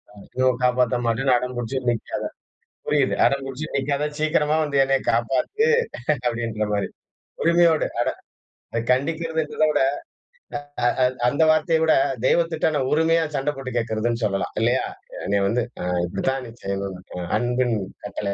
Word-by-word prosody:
ம், 100 Hz, -, -13 dB
யோ 130 Hz, -, +4 dB, 0.2 s
காப்பாத்த 125 Hz, 0 st, +3 dB
மாட்டேன்னு 125 Hz, +3 st, +2 dB
அடம்பிடிச்சு 125 Hz, 0 st, -3 dB
நிக்காத. 115 Hz, -2 st, -2 dB, 0.6 s
புரியுது -, -, +2 dB
"அடம் 140 Hz, 0 st, +2 dB
பிடிச்சு 135 Hz, +3 st, -5 dB
நிக்காத 140 Hz, +1 st, 0 dB
சீக்கிரமா 155 Hz, 0 st, +2 dB
வந்து 145 Hz, -2 st, -1 dB
என்னைய 135 Hz, 0 st, +1 dB
காப்பாத்து" 135 Hz, -, +1 dB, 0.6 s
அப்படின்ற 115 Hz, -3 st, -1 dB
மாரி. 100 Hz, -1 st, 0 dB, 0.6 s
உரிமையோடு 170 Hz, -1 st, +4 dB
அட -, -, +1 dB, 0.8 s
கண்டிக்கிறது 160 Hz, +5 st, 0 dB
என்பத 155 Hz, +1 st, -2 dB
விட 145 Hz, -2 st, +2 dB, 1.5 s
அந்த 145 Hz, +5 st, +3 dB
வார்த்தைய 155 Hz, +1 st, +3 dB
விட 160 Hz, -, +5 dB, 0.3 s
தெய்வத்திட்ட 165 Hz, +2 st, +2 dB
நான் 130 Hz, -2 st, 0 dB
உரிமையா 160 Hz, +1 st, +3 dB
சண்ட 135 Hz, +2 st, 0 dB
போட்டுக் 130 Hz, -2 st, -4 dB
கேட்கிறதுனு 115 Hz, +1 st, -1 dB
சொல்லலாம். 95 Hz, -2 st, -1 dB
இல்லையா? 120 Hz, +3 st, +2 dB, 0.4 s
என்னைய 100 Hz, 0 st, +1 dB
வந்து 120 Hz, +5 st, +1 dB, 0.4 s
இப்படித்தான் 125 Hz, +8 st, -2 dB
செய்யணும். 100 Hz, -1 st, -3 dB, 0.4 s
அன்பின் 120 Hz, 0 st, +1 dB, 0.3 s
கட்டளை, 100 Hz, -1 st, -3 dB
130 Hz, 125 wpm, -23 LUFS, 115-155 Hz, 1.5 s, விட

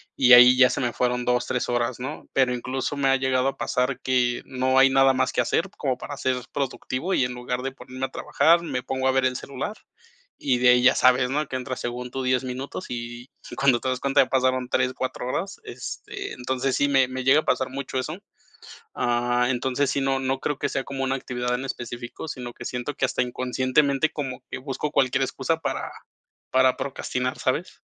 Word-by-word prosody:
y 125 Hz, -2 st, +6 dB
ahí 125 Hz, +1 st, +9 dB
ya 125 Hz, -1 st, +7 dB
se -, -, -2 dB
me 120 Hz, -2 st, -1 dB
fueron 125 Hz, 0 st, 0 dB
2, 125 Hz, 0 st, +1 dB
3 125 Hz, -1 st, -2 dB
horas, 120 Hz, 0 st, -1 dB
¿no? 140 Hz, +5 st, -6 dB
Pero 130 Hz, -2 st, +3 dB
incluso 130 Hz, +3 st, -3 dB
me 140 Hz, -1 st, +2 dB
ha 135 Hz, -, +5 dB
llegado 130 Hz, 0 st, +1 dB
a -, -, -7 dB
pasar 125 Hz, 0 st, -1 dB
que 125 Hz, -2 st, +1 dB
no 130 Hz, 0 st, 0 dB
hay 135 Hz, -, +7 dB
nada 135 Hz, 0 st, +5 dB
más 130 Hz, -, +1 dB
que -, -, +2 dB
hacer -, -, 0 dB
como -, -, -1 dB
para -, -, -7 dB
ser 130 Hz, -1 st, 0 dB, 0.2 s
productivo, 140 Hz, +4 st, -2 dB
y 130 Hz, -, +3 dB
en 125 Hz, -, -4 dB
lugar 125 Hz, 0 st, -3 dB
de 135 Hz, -, -3 dB
ponerme 130 Hz, 0 st, -6 dB
a -, -, -21 dB
trabajar, 170 Hz, +1 st, +3 dB
me 125 Hz, -7 st, -3 dB
pongo 130 Hz, 0 st, -1 dB
a 130 Hz, -, +4 dB
ver 130 Hz, 0 st, +2 dB
el 130 Hz, 0 st, +1 dB
celular 140 Hz, +11 st, -5 dB, 0.6 s
y 130 Hz, -3 st, +1 dB
de 125 Hz, -, +4 dB
ahí 125 Hz, 0 st, +5 dB
ya 130 Hz, -, +6 dB
sabes, 125 Hz, 0 st, +4 dB
¿no?, 150 Hz, +2 st, -1 dB
que 130 Hz, -, -5 dB
entras, 130 Hz, 0 st, -4 dB
según 125 Hz, +1 st, -5 dB
tú, 135 Hz, -, -3 dB
10 130 Hz, 0 st, +1 dB
minutos 130 Hz, +7 st, -5 dB
y 120 Hz, +1 st, -6 dB, 0.2 s
y -, -, -8 dB
cuando 135 Hz, -3 st, +3 dB
te 130 Hz, -, -4 dB
das 130 Hz, 0 st, -1 dB
cuenta, 140 Hz, +1 st, +4 dB
ya -, -, -7 dB
pasaron 130 Hz, -1 st, +1 dB
3, 125 Hz, 0 st, +1 dB
4 130 Hz, -1 st, -4 dB
horas, 190 Hz, +9 st, -3 dB
este, 400 Hz, -1 st, -7 dB
entonces, 130 Hz, +1 st, -1 dB
sí 145 Hz, -, +2 dB
me 135 Hz, -2 st, +4 dB
me 130 Hz, 0 st, -5 dB
llega 135 Hz, +3 st, +5 dB
a -, -, -19 dB
pasar 130 Hz, -, +1 dB
mucho 130 Hz, -1 st, -5 dB
eso. 155 Hz, +7 st, -4 dB, 0.8 s
Ah, 120 Hz, 0 st, +1 dB
entonces 130 Hz, +2 st, 0 dB
sí, 140 Hz, -, 0 dB
no 135 Hz, 0 st, +1 dB
no 135 Hz, 0 st, -1 dB
creo 145 Hz, +1 st, -2 dB
que 145 Hz, -, -1 dB
sea 135 Hz, -, -2 dB
como 135 Hz, -1 st, -4 dB
una 135 Hz, 0 st, 0 dB
actividad 125 Hz, -2 st, -3 dB
en 130 Hz, -, -4 dB
específico, 120 Hz, +2 st, -6 dB
sino 125 Hz, -4 st, -6 dB
que -, -, -10 dB
siento 125 Hz, +3 st, -4 dB
que 135 Hz, -, +1 dB
hasta 125 Hz, -, -1 dB
inconscientemente 130 Hz, +4 st, +1 dB
como 135 Hz, -4 st, -5 dB
que -, -, -4 dB
busco 140 Hz, +2 st, -4 dB
cualquier 135 Hz, +1 st, +2 dB
excusa 135 Hz, +4 st, -1 dB
para -, -, -3 dB, 0.6 s
para 130 Hz, 0 st, +4 dB
procrastinar, 125 Hz, -2 st, -3 dB
¿sabes? -, -, -2 dB
130 Hz, 220 wpm, -24 LUFS, 125-135 Hz, 0.8 s, ahí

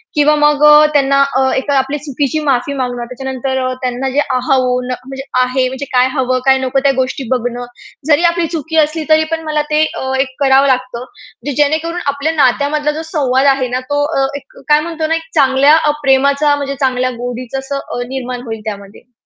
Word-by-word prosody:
किंवा 300 Hz, 0 st, +4 dB
मग 295 Hz, 0 st, +2 dB
अ, 300 Hz, 0 st, +8 dB
त्यांना 275 Hz, -1 st, +3 dB, 0.2 s
अ, 265 Hz, -, +2 dB
एक 270 Hz, -, -3 dB
आपली 275 Hz, +1 st, 0 dB
चुकीची 290 Hz, +1 st, -2 dB
माफी 275 Hz, 0 st, 0 dB
मागणं. 245 Hz, -3 st, -3 dB
त्याच्यानंतर 265 Hz, 0 st, -3 dB, 0.2 s
त्यांना 255 Hz, +1 st, -2 dB
जे 270 Hz, +2 st, -1 dB, 0.2 s
अहून, 250 Hz, -1 st, 0 dB
म्हणजे 265 Hz, +2 st, -7 dB, 0.2 s
आहे 255 Hz, +1 st, +1 dB
म्हणजे 265 Hz, +2 st, -5 dB
काय 250 Hz, 0 st, +4 dB
हवं, 255 Hz, -2 st, 0 dB
काय 265 Hz, 0 st, +5 dB
नको 265 Hz, +1 st, 0 dB
त्या 280 Hz, -, +4 dB
गोष्टी 260 Hz, +1 st, -3 dB
बघणं. 245 Hz, -1 st, -2 dB, 0.4 s
जरी 310 Hz, +2 st, +3 dB
आपली 340 Hz, -1 st, -1 dB
चुकी 320 Hz, +1 st, -3 dB
असली 310 Hz, +1 st, -5 dB
तरी 315 Hz, 0 st, +5 dB
पण 325 Hz, 0 st, -2 dB
मला 305 Hz, -1 st, 0 dB
ते 305 Hz, +1 st, +3 dB
अ, 265 Hz, -, -4 dB
एक 260 Hz, -1 st, -1 dB
करावं 270 Hz, +1 st, +4 dB
लागतं. 255 Hz, -2 st, -1 dB, 0.4 s
जे 290 Hz, -, -2 dB
जेणेकरून 320 Hz, +4 st, 0 dB
आपल्या 285 Hz, +3 st, -2 dB
नात्यामधला 290 Hz, +2 st, +1 dB
जो 310 Hz, +2 st, -5 dB
संवाद 265 Hz, -3 st, +1 dB
आहे 260 Hz, -2 st, -2 dB
ना -, -, 0 dB
तो 290 Hz, 0 st, +1 dB
अ, 270 Hz, -, +2 dB
एक -, -, -16 dB
काय 295 Hz, -, +5 dB
म्हणतो 320 Hz, 0 st, -3 dB
ना, 325 Hz, -, +1 dB
एक 325 Hz, 0 st, -6 dB
चांगल्या 270 Hz, +3 st, +4 dB
अ, 300 Hz, -2 st, +2 dB
प्रेमाचा 280 Hz, +2 st, +3 dB
म्हणजे 280 Hz, -1 st, -4 dB
चांगल्या 255 Hz, -1 st, +1 dB
गोडीचं 245 Hz, +1 st, -5 dB
असं 270 Hz, +1 st, -5 dB
अ, 245 Hz, -, -6 dB
निर्माण 255 Hz, -2 st, -5 dB
होईल 225 Hz, -2 st, -6 dB
त्यामध्ये. 205 Hz, +3 st, -9 dB
270 Hz, 195 wpm, -15 LUFS, 255-295 Hz, 0.4 s, अ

